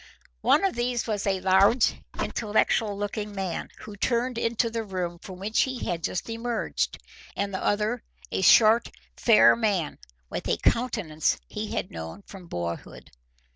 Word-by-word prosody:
One 315 - +4
of 385 - +1
these 240 0 -1
was 210 -3 -2
a 190 -1 +1
large, 195 +5 +4 0.3
intellectual 215 -1 +1
looking 205 0 -4
man, 190 -3 -3
who 210 - -9
turned 235 +3 0
into 230 0 0
the 230 0 -2
room 180 -4 -4
from 185 +1 -10
which 205 +4 +1
he 260 -2 -2
had 170 -2 -2
just 180 - -2
emerged, 230 +1 -2 0.4
and 200 0 -2
the 190 - -3
other 215 +3 0 0.3
a - - -1
short, 220 +4 +6 0.3
fair 230 -3 +6
man, 205 -8 -1 0.3
with - - -5
a 85 - +2
countenance 210 - +1
he - - -5
had - - -3
known 80 - -7
from 190 -3 -12
boyhood. 85 - -6
205 Hz, 155 wpm, -26 LUFS, 185-230 Hz, 0.4 s, short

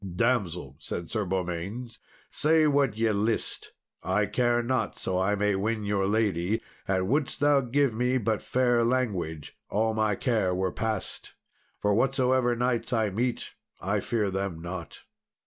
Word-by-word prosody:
"Damsel," 90 - 0
said 85 -1 -5
Sir 110 -3 -1
Beaumains, 95 +6 -3 0.3
"say 155 +1 +3
what 140 -6 +2
ye 115 0 +2
list, 105 +2 -2 0.3
I 95 +4 +1
care 120 +3 +1
not 120 -3 -1
so 95 -1 -1
I 95 +2 +2
may 105 0 +1
win 105 +3 -1
your 100 -1 0
lady; 105 -1 +1 0.3
and 95 -1 +1
wouldst 140 +6 0
thou 145 -1 +4
give 135 0 +1
me 125 +3 +1
but 110 -3 0
fair 120 -2 +2
language, 100 - -1
all 110 +2 +1
my 110 -2 +1
care 105 -6 +1
were 95 0 0
past; 110 -3 -4 0.5
for 105 0 +2
whatsoever 130 0 +2
knights 125 +1 0
I 110 -4 +1
meet, 120 +5 -2 0.3
I 100 +3 0
fear 105 -1 -1
them 95 -3 -3
not." 85 +1 -7
110 Hz, 150 wpm, -28 LUFS, 95-125 Hz, 0.5 s, thou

